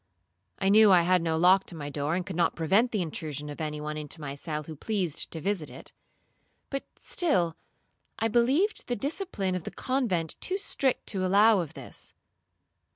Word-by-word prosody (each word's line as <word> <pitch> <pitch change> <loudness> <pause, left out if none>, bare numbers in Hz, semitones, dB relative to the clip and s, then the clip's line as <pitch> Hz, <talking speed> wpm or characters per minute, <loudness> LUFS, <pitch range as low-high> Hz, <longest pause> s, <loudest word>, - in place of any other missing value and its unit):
I 195 - +1
knew 215 0 +7
I 175 -2 +6
had 180 0 +3
no 165 -1 0
lock 185 +3 +5
to 175 - -7
my 145 -2 -6
door, 145 +3 -1
and 180 -1 -2
could 190 - -6
not 170 -1 +1
prevent 195 +9 +3
the 210 -6 -1
intrusion 150 -3 -5
of 145 - -7
any 150 -1 -3
one 150 0 -4
into 150 +1 -6
my 140 -3 -5
cell 150 +2 -4
who 155 +1 -8
pleased 185 -2 -2
to 165 - -6
visit 185 -3 -2
it; - - -12 0.8
but 275 -1 -2
still 180 - +1 0.6
I 225 - +1
believed 265 - +2
the 245 - -1
discipline 275 - -2
of 180 -2 -3
the - - -5
convent 225 - -1
too 375 - +1
strict 275 -9 +1
to 190 -2 -1
allow 205 +3 +5
of 165 -5 -5
this. - - -8
185 Hz, 190 wpm, -28 LUFS, 160-220 Hz, 0.8 s, knew